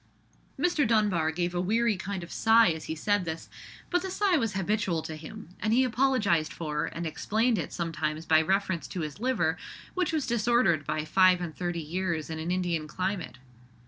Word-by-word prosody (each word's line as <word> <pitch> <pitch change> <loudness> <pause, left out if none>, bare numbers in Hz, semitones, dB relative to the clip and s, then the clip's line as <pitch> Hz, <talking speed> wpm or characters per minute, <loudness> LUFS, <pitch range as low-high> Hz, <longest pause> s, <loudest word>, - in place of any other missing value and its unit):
Mr. 315 -7 +2
Dunbar 205 -8 +2
gave 175 +2 -2
a 175 - 0
weary 225 +4 +2
kind 190 0 -5
of 170 - -10
sigh 225 -1 +5
as 160 -1 -5
he 160 - -4
said 205 +4 +1
this; 165 -1 -5 0.4
but 355 0 +2
the 380 - -4
sigh 385 -1 +2
was 225 -9 0
habitual 190 -3 0
to 155 - -6
him, 155 +1 -10
and 215 +1 0
he 255 +3 +5
apologized 240 -10 +2
for 150 -2 -3
and 170 +1 -5
explained 220 +8 0
it - - -4
sometimes 160 -2 -3
by 155 -1 +5
reference 185 -4 0
to 175 +7 -5
his 155 +3 -5
liver, 205 -10 +1 0.4
which 365 -3 0
was 310 -4 0
disordered 235 - +2
by 155 0 -1
five 185 +2 +5
and 170 -3 -5
thirty 175 -1 -3
years 170 -1 -2
in 160 - -4
an 160 +2 -4
Indian 175 -4 -1
climate. 185 -4 -3
180 Hz, 190 wpm, -28 LUFS, 160-225 Hz, 0.4 s, sigh